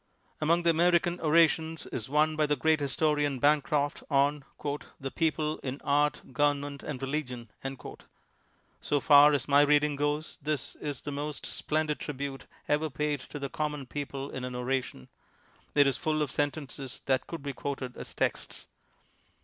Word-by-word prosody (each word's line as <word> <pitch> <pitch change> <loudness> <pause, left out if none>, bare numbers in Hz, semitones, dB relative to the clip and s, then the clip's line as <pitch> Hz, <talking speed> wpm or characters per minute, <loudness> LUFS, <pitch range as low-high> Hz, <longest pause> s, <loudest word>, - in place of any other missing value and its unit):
Among 170 +3 +3
the 170 - +5
American 175 +1 +3
orations 160 0 +3
is 115 0 -5
one 155 +2 +3
by 155 -1 +2
the 150 - +2
great 160 +1 +2
historian, 145 0 +1
Bancroft, 145 +1 +2
on 140 0 +2
' 145 0 -2
' - - -19
The 135 -1 -4
people 155 -1 0
in 135 +1 -5
Art, 145 +1 +2
Government 145 +1 0
and 145 -4 -5
Religion." 130 -5 -4 1.3
So 145 - +1
far 145 +1 +7
as 140 -3 0
my 145 0 +6
reading 145 0 +4
goes, 145 +2 -2
this 150 -2 -1
is 145 -4 -4
the 145 - -5
most 145 +1 -4
splendid 155 -1 -1
tribute 140 -1 -5 0.2
ever 150 +2 +1
paid 150 +1 -1
to 140 - -8
the 140 -1 -4
common 150 -2 -3
people 140 +1 -5
in 130 - -5
an 125 0 -4
oration. 125 - -2 0.7
It 145 -1 +6
is 135 -1 +1
full 155 -1 0
of 145 - -3
sentences 145 -4 -3
that 130 -1 +1
could 165 -4 -6
be 140 -1 -3
quoted 135 -2 -4
as - - -7
texts. - - -2
145 Hz, 165 wpm, -29 LUFS, 140-150 Hz, 1.3 s, far